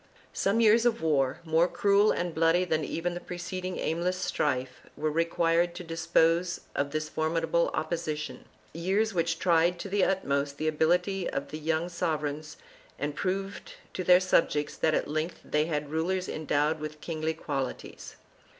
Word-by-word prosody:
Some 200 +4 +1
years 225 +1 +5
of 230 -4 0
war, 140 -2 +1
more 165 +1 +3
cruel 200 +3 +3
and 175 -1 -2
bloody 165 +3 +3
than 160 -3 0
even 175 +3 -2
the 175 - -4
preceding 180 +1 -5
aimless 175 +3 -1
strife, 130 -7 -1 0.2
were 155 +1 0
required 165 +1 +1
to 180 - -6
dispose 165 +1 +1
of 140 0 -1
this 155 +1 -2
formidable 165 +2 0
opposition 155 -2 -3 0.2
— - - -31 0.2
years 215 +3 +2
which 165 -1 0
tried 170 0 +3
to 200 - -6
the 200 0 +2
utmost 140 -6 0
the 155 - -2
ability 175 +4 +1
of 140 - -4
the 155 - -6
young 160 +2 0
sovereigns 155 -3 -3 0.4
and 145 +1 -3
proved 195 +2 -3 0.2
to 185 - -3
their 180 0 +7
subjects 160 -5 +1
that 155 -1 +1
at - - 0
length 155 +3 -3
they 150 0 +1
had 150 -3 -3
rulers 180 +4 -1
endowed 155 0 0
with 155 0 -6
kingly 160 0 -3
qualities. 135 -5 -5
165 Hz, 160 wpm, -28 LUFS, 155-180 Hz, 0.4 s, their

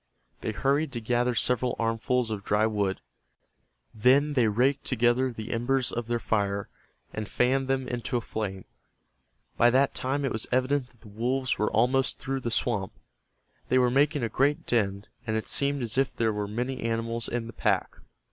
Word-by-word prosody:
They - - -3
hurried 140 +7 +1
to 120 - -2
gather 120 +2 0
several 125 +1 +2
armfuls 115 +1 0
of 105 -2 -4
dry 105 +2 +2
wood. 100 -3 -1 0.9
Then 135 +7 +4
they 125 -5 +3
raked 130 +6 +2
together 125 +1 +2
the 110 0 -7
embers 125 +2 0
of 120 -1 -4
their 120 0 0
fire, 100 -3 -1 0.4
and 110 -1 -5
fanned 130 +2 +1
them 135 -1 0
into 120 0 -2
a - - -2
flame. 100 -4 -5 0.9
By 120 - +6
that 135 +3 +3
time 140 +2 -1
it 135 - -1
was 110 - -4
evident 130 +1 +1
that 120 -2 -28
the 110 - -14
wolves 125 +5 -1
were 105 - +2
almost 125 +4 +2
through 135 0 -3
the 120 - -3
swamp. 105 - -1 0.8
They 130 - +4
were 125 -1 +4
making 140 +1 +2
a - - +1
great 140 +5 +1
din, 100 -4 0 0.2
and 110 0 0
it 110 - -4
seemed 140 -1 +1
as 115 +2 -1
if 135 - 0
there 110 -1 +1
were 105 0 -2
many 125 +5 -3
animals 115 0 -2
in 120 -1 -2
the 115 - -9
pack. - - 0
120 Hz, 185 wpm, -27 LUFS, 110-130 Hz, 0.9 s, By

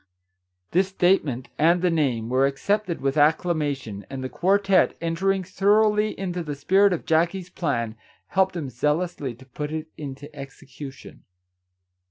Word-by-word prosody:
" 90 0 -52
This 185 +2 +3
statement, 175 -9 +1
and 170 +3 +4
the 180 - +3
name, 130 -9 0
were 130 +3 +3
accepted 190 +6 -1
with 135 +2 0
acclamation, 145 - +1
and 135 -1 -5
the 130 - -3
quartette, 195 +5 +2
entering 190 +3 0
thoroughly 210 +3 +2
into 180 -2 -3
the 150 -3 -4
spirit 190 +8 +4
of 175 - -2
Jackie's 170 +3 +1
plan, 120 -11 -1 0.4
helped 190 -1 +2
him 145 -6 -4
zealously 150 0 -1
to 130 +3 -16
put 145 +3 -5
it 160 0 -4
into 145 +1 -8
execution. 135 -1 -10
155 Hz, 145 wpm, -24 LUFS, 135-185 Hz, 0.4 s, and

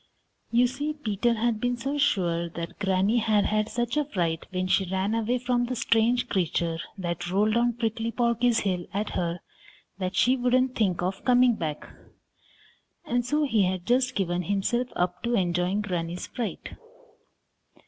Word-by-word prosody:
You 240 +2 +4
see, 285 +5 -2
Peter 235 -4 0
had 225 -1 0
been 245 0 0
so 275 +4 -3
sure 170 -11 +1
that 170 0 -7
Granny 195 +3 +2
had 215 -2 +2
had 215 0 0
such 240 +3 -2
a 300 - +3
fright 170 - -2
when 185 0 -2
she 185 0 +1
ran 190 +3 0
away 230 +2 +1
from 245 0 0
the 255 +1 -3
strange 235 +2 +2
creature 170 -4 -1 0.2
that 175 -2 -3
rolled 210 +4 +2
down 240 +1 +2
Prickly 225 0 -2
Porky's 235 0 +2
hill 180 -3 -2
at 205 +1 -1
her 170 0 -2 0.6
that 185 0 -2
she 255 +2 +4
wouldn't 255 0 +2
think 185 -7 0
of 190 +2 -3
coming 250 -1 +5
back, 155 -8 -4 1.2
and 245 0 0
so 295 +5 +1
he 230 -7 +2
had 185 -1 -2
just 250 +1 +2
given 175 -2 0
himself 200 +7 0
up 180 0 -1
to 235 0 0
enjoying 180 +1 +1
Granny's 175 -3 -3
fright. 235 -4 -5
215 Hz, 165 wpm, -26 LUFS, 180-245 Hz, 1.2 s, coming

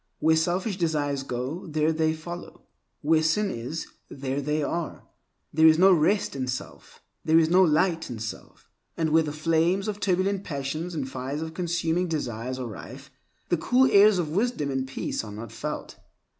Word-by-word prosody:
Where 160 0 +3
selfish 180 +5 0
desires 150 -5 0
go, 135 +7 -4
there 155 0 +1
they 160 0 +1
follow; 175 +2 -9 0.4
where 155 +1 +3
sin 190 +6 +1
is, 125 +8 -5 0.2
there 135 0 -3
they 150 +2 -1
are. 170 +2 -3 0.5
There 160 +1 +6
is 155 0 +6
no 190 +2 +7
rest 180 +2 +2
in 130 -2 -2
self; 125 0 -7 0.2
there 160 +1 +4
is 165 0 +4
no 185 +2 +6
light 165 0 +2
in 120 - -5
self. 110 0 -8 0.3
And 160 -2 0
where 160 +1 +5
the 155 -2 -3
flames 165 +6 +1
of 210 -1 -3
turbulent 190 +1 0
passions 155 +3 -4
and 140 -4 -2
fires 135 +4 -4
of 160 0 -6
consuming 170 0 0
desires 130 -5 -3
are 130 - -4
rife, 130 +5 -9 0.4
the 175 - +2
cool 255 +10 +3
airs 205 0 +7
of 170 -4 -1
wisdom 190 - 0
and 135 0 -2
peace 135 - -3
are 105 - -8
not 110 +2 -8
felt. - - -6
160 Hz, 180 wpm, -26 LUFS, 140-175 Hz, 0.5 s, no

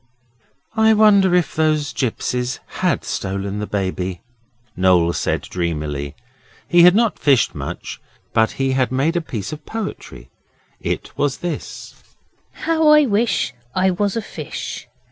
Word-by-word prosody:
'I 220 0 +5
wonder 200 -4 +5
if 175 -2 +1
those 155 -4 +1
gipsies 125 +1 -2 0.2
HAD - - +1
stolen 100 +1 -3
the 105 - -3
Baby?' 95 -2 -3 0.5
Noel 90 -2 +3
said - - -1
dreamily. 75 -5 -3 0.5
He 175 0 +5
had 180 +2 +8
not 230 0 +2
fished 140 -5 +3
much, - - -6 0.3
but 110 0 +3
he 135 0 0
had 130 -1 +1
made 140 +6 +1
a 175 - +1
piece 115 - -5
of 155 0 -8
poetry. 105 - -7 0.5
It - - -4
was 145 -1 +1
this: 175 - -6 0.5
'How 320 -1 0
I 300 -1 +7
wish 215 - +1 0.2
I 185 +1 +3
was 200 +3 -1
a 225 - -2
fish. - - -7
140 Hz, 140 wpm, -20 LUFS, -, 0.5 s, had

